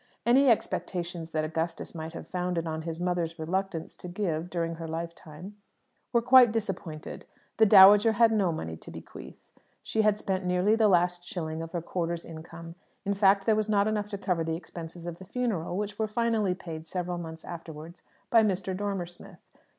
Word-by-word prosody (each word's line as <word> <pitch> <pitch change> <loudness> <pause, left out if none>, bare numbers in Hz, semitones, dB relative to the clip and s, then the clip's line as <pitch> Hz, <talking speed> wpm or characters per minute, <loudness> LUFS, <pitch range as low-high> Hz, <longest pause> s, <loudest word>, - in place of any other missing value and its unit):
Any 260 +3 +5
expectations 175 -6 -1
that 155 -1 -1
Augustus 165 +1 -3
might 160 0 -6
have - - -8
founded 180 -2 -2
on 160 -1 -3
his 165 0 -5
mother's 175 -2 -1
reluctance 170 +1 -3
to - - -8
give 175 -3 -2
during 165 -2 -2
her 165 0 -6
lifetime 170 +3 -7 0.5
were 235 -2 +2
quite 250 -1 +7
disappointed. 195 -8 -5 0.3
The 220 - +6
dowager 205 +2 +8
had 230 +1 +5
no 200 -5 +2
money 80 - -4
to - - -12
bequeath. - - -10 0.5
She 220 - 0
had 210 -1 +3
spent 190 -2 -2
nearly 180 +4 +2
the 225 -1 +4
last 175 -2 +2
shilling 160 -3 -4
of 165 0 -7
her 170 -2 -2
quarter's 170 -1 -3
income. 165 +1 -9 0.3
In 200 - +1
fact, 195 0 +4
there 220 - +4
was 215 0 -1
not 205 -1 +3
enough 210 -1 -1
to 200 - -4
cover 180 -4 -1
the 160 0 -2
expenses 170 0 -8
of 175 -1 -6
the - - -9
funeral, 190 -7 -2
which 205 0 -4
were 220 - +1
finally 215 -3 +1
paid 165 -3 -8
several 180 0 -3
months 160 -1 -8
afterwards 165 0 -9 0.3
by 230 - +7
Mr. 190 -3 0
Dormer 200 -2 -2
Smith. 175 0 -13
180 Hz, 185 wpm, -28 LUFS, 165-205 Hz, 0.5 s, dowager